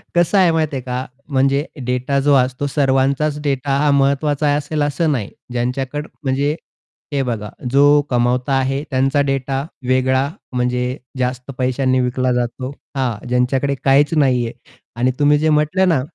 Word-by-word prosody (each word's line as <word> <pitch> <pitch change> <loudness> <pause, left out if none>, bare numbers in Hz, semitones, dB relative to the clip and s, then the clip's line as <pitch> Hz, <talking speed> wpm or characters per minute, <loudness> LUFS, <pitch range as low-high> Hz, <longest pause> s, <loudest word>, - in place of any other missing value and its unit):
कसं 175 +3 +3
आहे 180 -3 +5
माहिती 155 -3 0
आहे - - -4
का? 125 +1 -4 0.2
म्हणजे 140 +2 +2 0.2
डेटा 125 +2 0
जो 145 +1 +3
असतो 130 +2 +1
सर्वांचाच 140 +1 +1
डेटा 135 -1 0
हा 150 +1 +2
महत्त्वाचा 140 +1 +2
असेल 150 +1 -2
असं 145 +2 +1
नाही. 110 -7 -2 0.2
ज्यांच्याकड 130 +5 -2 0.2
म्हणजे 140 +3 0 0.6
हे 140 - +1
बघा 110 -4 -3 0.2
जो 140 +2 +5 0.3
कमावता 125 +2 +1
आहे 135 +2 0
त्यांचा 135 +2 +2
डेटा 135 +1 -1 0.2
वेगळा 130 +1 +2 0.3
म्हणजे 125 +1 -1 0.2
जास्त 125 +1 -2
पैशांनी 130 0 +1
विकला 125 +1 0
जातो. 125 +2 -2 0.2
हां, 125 -4 -2
ज्यांच्याकडे 130 +3 +1
काहीच 140 +3 +4
नाहीये. 125 -5 +2 0.4
आणि 125 +2 +1
तुम्ही 150 0 +4
जे 155 +1 +2
म्हटलं 155 +5 +2
ना 160 -7 +2
135 Hz, 150 wpm, -19 LUFS, 125-145 Hz, 0.6 s, आहे